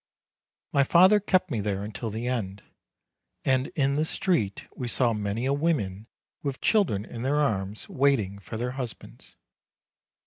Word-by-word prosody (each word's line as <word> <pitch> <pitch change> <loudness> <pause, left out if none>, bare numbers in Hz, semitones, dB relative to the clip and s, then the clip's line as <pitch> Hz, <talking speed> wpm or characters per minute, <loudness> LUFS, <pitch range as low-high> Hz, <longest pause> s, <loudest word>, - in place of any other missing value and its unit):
My 140 - +5
father 185 +8 +6
kept 185 -3 +1
me 115 - 0
there 100 -1 -2
until 110 +2 -4
the 110 +3 -4
end, 105 -6 -3 0.8
and 130 0 +2
in 140 -1 +1
the 155 - +2
street 155 - 0
we 125 - -4
saw 120 -1 +2
many 105 +3 -2
women 125 - 0 0.3
with 140 -2 -3
children 170 - +2
in 115 - -8
their 140 +4 +1
arms, 105 -7 -1
waiting 125 -8 +1
for 105 +2 -7
their 125 +2 -2
husbands. 125 -3 -8
125 Hz, 145 wpm, -27 LUFS, 105-140 Hz, 0.8 s, father